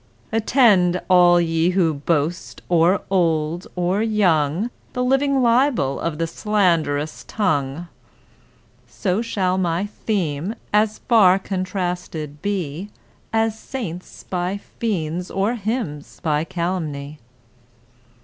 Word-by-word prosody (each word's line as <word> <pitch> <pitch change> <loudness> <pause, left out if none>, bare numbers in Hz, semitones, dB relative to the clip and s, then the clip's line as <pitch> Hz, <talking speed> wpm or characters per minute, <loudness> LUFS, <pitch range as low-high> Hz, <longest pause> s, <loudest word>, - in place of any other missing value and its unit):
— - - -33
Attend, 205 -7 +4
all 175 -1 +6
ye 165 0 +1
who 165 -4 +3
boast,—or 170 +4 0
old 165 -2 +1
or 180 +3 0
young,— 195 -2 +1 0.2
The 250 - -1
living 270 +1 +2
libel 235 - +2
of 165 -2 -3
a 165 - +1
slanderous 165 -6 0
tongue! 160 -5 -1 1.0
So 190 +1 -1
shall 190 -5 0
my 175 +1 0
theme, 195 -3 -2 0.2
as 210 0 +3
far 200 -6 +6
contrasted 180 -6 -4
be, 190 -2 -3 0.4
As 225 -1 0
saints 185 -10 -7
by 180 +2 -2
fiends 180 -6 -3
or 200 +4 0
hymns 215 - -4
by 155 -1 +1
calumny. 155 -5 -4
180 Hz, 105 wpm, -21 LUFS, 160-210 Hz, 1.0 s, all